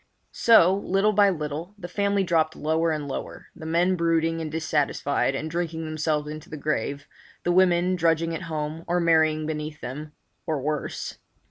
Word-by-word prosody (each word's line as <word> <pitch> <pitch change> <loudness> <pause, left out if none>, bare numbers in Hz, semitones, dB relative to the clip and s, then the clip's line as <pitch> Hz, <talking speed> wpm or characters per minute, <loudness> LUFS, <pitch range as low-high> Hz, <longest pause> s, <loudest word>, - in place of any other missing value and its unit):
So, 190 -6 +6
little 200 +1 +2
by 205 -1 +5
little, 160 +2 -4
the 175 - -7
family 200 +1 +1
dropped 160 -3 +1
lower 160 +2 +1
and 150 -2 -2
lower, 135 - -6
the 160 - -8
men 175 +3 +2
brooding 165 -1 +1
and 155 -1 -4
dissatisfied, 145 -3 0
and 145 +3 -3
drinking 165 0 -3
themselves 155 -1 -1
into 155 +1 -8
the 155 - -6
grave, 145 -1 -2 0.4
the 175 - +1
women 180 0 +3
drudging 165 -1 +1
at 165 - -4
home, 155 +1 -3
or 175 +1 +1
marrying 160 -2 +3
beneath 150 -1 -4
them—or 150 +3 -6
worse. 150 +2 -3
160 Hz, 160 wpm, -25 LUFS, 155-175 Hz, 0.4 s, So